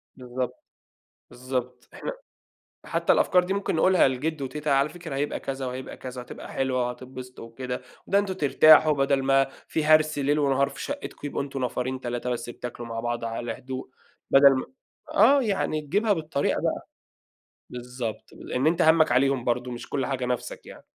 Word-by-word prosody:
بالضبط، 125 0 -5 0.7
بالضبط. 125 -1 -5
إحنا - - -5 0.7
حتّى - - +1
الأفكار 180 -1 +3
دي 190 - -1
ممكن 200 -3 -1
نقولها 185 -3 +5
لجِدّو 140 +3 -2
وتيتة، 150 +3 -3
على 140 +1 +3
فكرة 155 -4 -7
هيبقى 145 +1 -2
كذا 135 -1 -4
وهيبقى 130 +1 -6
كذا 125 -1 -7
وهتبقى 125 - -9
حلوة 130 -2 0
وهتتبسطوا 125 0 -8
وكده، 125 +2 -5 0.2
ده 200 - +3
أنتم 200 -2 -1
ترتاحوا 155 -1 +6
بَدَل 135 -1 +1
ما 135 0 +4 0.2
في 160 - -1
هَرْس 155 0 +4
ليل 145 +2 +1
ونهار 140 -1 +2
في 140 - -9
شقتكم، 285 - -6
يبقوا 140 - -2
أنتم 135 -2 -4
نفرين، 125 +1 -2
3 120 0 -3
بس 120 0 -3
بتاكلوا 120 -1 -7
مع 115 0 -4
بعض 120 0 -3
على 115 0 -3
هدوء، 130 0 -6 0.4
بَدَل 140 0 +8
ما 130 - -3 0.5
آه، 270 +7 +6
يعني 195 -8 0
تجيبها 205 +9 +1
بالطريقة 155 -5 -1
بقى. - - -2 0.8
بالضبط، 125 -2 -6
لإن 130 +4 -3
أنت 170 +2 +3
همّك 160 -4 +5
عليهم 130 0 +2
برضه 125 +1 -1
مش 120 -1 -7
كل 135 -3 -1
حاجة 130 -2 -2
نَفْسك 125 -1 -4
يعني. - - -12
135 Hz, 170 wpm, -26 LUFS, 125-155 Hz, 0.8 s, بَدَل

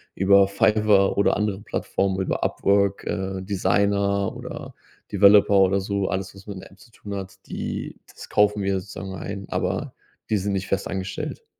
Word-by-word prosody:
über 100 +1 +5
Fiverr 105 0 +3
oder 100 - +2
andere 105 -1 -1
Plattformen, 95 -1 -2
über - - -2
Upwork, 100 0 +1
äh, 95 0 -3
Designer 100 0 +1
oder - - -8 0.4
Developer 100 0 +6
oder 95 +1 +4
so, 100 0 -2
alles, 95 0 -3
was 100 +1 -15
man 100 - -6
mit 95 - -9
der - - -14
App 95 - -20
zu 130 - -18
tun 105 -3 -9
hat, 95 -1 -6
die - - -5
das - - -12
kaufen 105 -1 +2
wir 95 -1 0
sozusagen 95 0 -8
ein, 100 +2 -6
aber - - -2 0.4
die 105 - +3
sind 100 +1 -2
nicht 95 0 -2
fest 95 - -1
angestellt. 95 0 -5
100 Hz, 175 wpm, -24 LUFS, 95-100 Hz, 0.4 s, Developer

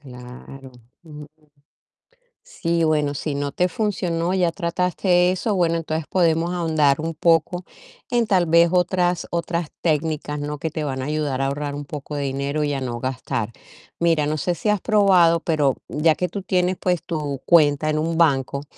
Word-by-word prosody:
Claro. 130 0 -12 0.3
Ujú. 150 -2 -10 1.2
Sí, 170 - -1
bueno, 150 -2 +1
si 145 +1 -4
no 140 -1 -3
te 180 +1 +1
funcionó, 180 -6 -1
ya 180 -3 +2
trataste 180 +1 +1
eso, 200 +3 -1
bueno, 170 -2 +2
entonces 160 -1 -3
podemos 170 -1 +2
ahondar 155 -5 +2
un 165 +1 -3
poco 170 +2 +2 0.5
en 240 -2 +2
tal 185 -5 +2
vez 170 +1 +5
otras 180 -1 +1
otras 170 -1 -2
técnicas, 155 -2 -1
¿no? 150 0 -4
Que 160 - -3
te 155 0 -4
van 130 -3 -3
a - - -4
ayudar 145 -3 -2
a 135 - +1
ahorrar 145 +1 -3
un 145 0 -6
poco 150 0 -7
de 145 - -2
dinero 140 +2 -2
y 145 - -1
a 135 - -3
no 120 -2 -4
gastar. 125 -4 -3 0.5
Mira, 165 -3 +2
no 150 +1 -1
sé 175 +4 -1
si 210 - -5
has 210 -3 +1
probado, 190 -6 +4
pero 150 -5 +1
ya 155 +1 +2
que 180 - -1
tú 195 +4 -6
tienes, 185 -1 0
pues 180 -3 0
tu 150 -5 -4
cuenta 155 -2 +4
en 155 - 0
un 165 +1 -1
banco, 140 -3 +1
160 Hz, 180 wpm, -22 LUFS, 145-175 Hz, 1.2 s, vez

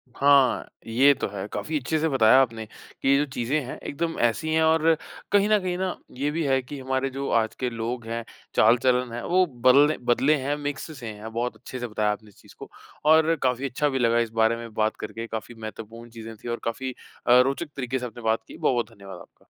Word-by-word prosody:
हाँ, 140 -2 +4 0.2
ये 130 +5 +5
तो - - -3
है। 100 0 -6
काफ़ी 155 0 -2
अच्छे 155 +4 -1
से 160 - +1
बताया 130 -1 +5
आपने 115 -4 -2 0.4
कि - - -1
ये 140 - +6
जो 145 - +2
चीज़ें 130 +5 0
हैं, 125 - -7
एकदम 165 +3 -3
ऐसी 140 +7 +1
है 160 0 +3
और 160 0 +4 0.4
कहीं 205 0 +4
न 210 -1 +4
कहीं 180 -1 -2
ना 185 0 -2 0.2
ये 145 +3 0
भी 165 +2 -1
है 135 -1 +2
कि 140 +3 -8
हमारे 130 +1 -1
जो 135 +1 -4
आज 110 - -4
के 125 - 0
लोग 115 +1 -4
हैं 115 0 -3 0.3
चाल-चलन 125 +2 +3
है, 120 - -5
वो 185 +1 +3
बल्ले 140 +2 +4
बदले 145 +5 +3
हैं, 140 +2 -1
मिक्स 145 +1 -5
से 120 - -7
हैं। 105 +2 -9
बहुत 120 +1 -2
अच्छे 125 +3 -8
से 120 - -3
बताया 105 -1 0
आपने 105 +1 -7
इस 100 - -23
चीज़ - - -18
को - - -9 0.4
और 160 +1 +5
काफ़ी 130 +1 +1
अच्छा 145 +4 0
भी 135 -1 -1
लगा 115 -1 +3
इस 115 -1 0
बारे 110 +1 +4
में 115 -2 -9
बात 110 0 0
करके। 115 +1 -6
काफ़ी 110 +1 -6
महत्वपूर्ण 115 +1 -9
चीज़ें 115 -1 -9
थी 120 - -11
और 120 - -2
काफ़ी 130 +3 -3 0.4
अ, 125 +1 +7
रोचक 140 +5 -1
तरीके 130 -1 -2
से 125 - -5
आपने 120 0 -9
बात 110 0 +1
की। - - -11
बहुत-बहुत 120 -2 0
धन्यवाद 95 -2 -10
आपका। - - -18
125 Hz, 230 wpm, -25 LUFS, 115-145 Hz, 0.4 s, अ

